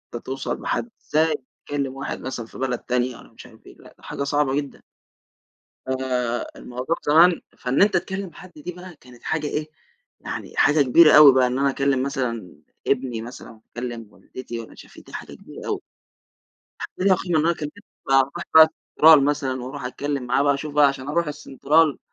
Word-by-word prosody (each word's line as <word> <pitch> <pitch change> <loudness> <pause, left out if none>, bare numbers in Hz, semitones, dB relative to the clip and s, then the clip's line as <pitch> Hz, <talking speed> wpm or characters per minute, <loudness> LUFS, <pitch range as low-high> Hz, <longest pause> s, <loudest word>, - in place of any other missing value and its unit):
أنت 120 - -7
توصَل 135 +1 -4
لحد، 240 - -2
إزاي 160 +1 +1 0.3
تكلّم 140 -2 -3
واحد 135 - -5
مثلًا 125 -3 -5
في - - -14
بلد 130 -2 -2
تانية 125 0 -2
والّا - - -16
مش - - -13
عارف 110 -3 -18
إيه، - - -14
لأ، - - -17
دي - - -26
حاجة 140 - -4
صعبة 140 -1 0
جدًا. 145 -1 -4 1.1
آآ، 125 -2 -1
الموضوع 125 +7 -4
زمان 165 +3 +5 0.2
فإن 125 +6 +1
أنت 205 +1 +4
تكلّم 190 -2 -3
حد 185 -2 -13
دي 165 +4 -7
بقى، 180 -1 -12
كانت 125 -1 -17
حاجة 155 -1 -2
إيه، 150 +1 -3 0.5
يعني - - -7
حاجة 145 0 +4
كبيرة 150 +4 +6
أوي 150 -2 +10
بقى، 130 -1 +4
إن 125 +1 -2
أنا 140 0 +2
أكلّم 135 -1 0
مثلًا 125 -8 -3 0.3
ابني 125 -4 -1
مثلًا 120 +1 -10
وأكلم 115 0 -8
والدتي 120 +4 -9
والّا 115 - -11
مش - - -13
عارف - - -19
إيه، - - -12
دي - - -16
حاجة - - -8
كبيرة - - -12
أوي، - - -2 1.0
حاجة - - -7
ليها 190 0 +4
قيمة. 175 -4 -1
أن 155 - +1
أنا 170 - +2
كان 150 -2 -5
لسه 205 - -17 0.2
بقى 135 0 +4
أرُوح 140 +6 -3
بقى 160 0 +11
السنترال 160 -1 +4
مثلًا 140 -3 -1
وأروح 135 +1 -7
أتكلم 140 +2 -3
معاه 125 +3 +2
بقى، 140 0 +3
أشوف 145 +1 -6
بقى 150 -1 +6
علشان 140 0 -3
أروح 170 +2 0
السنترال 150 0 +1
140 Hz, 200 wpm, -23 LUFS, 125-155 Hz, 1.1 s, بقى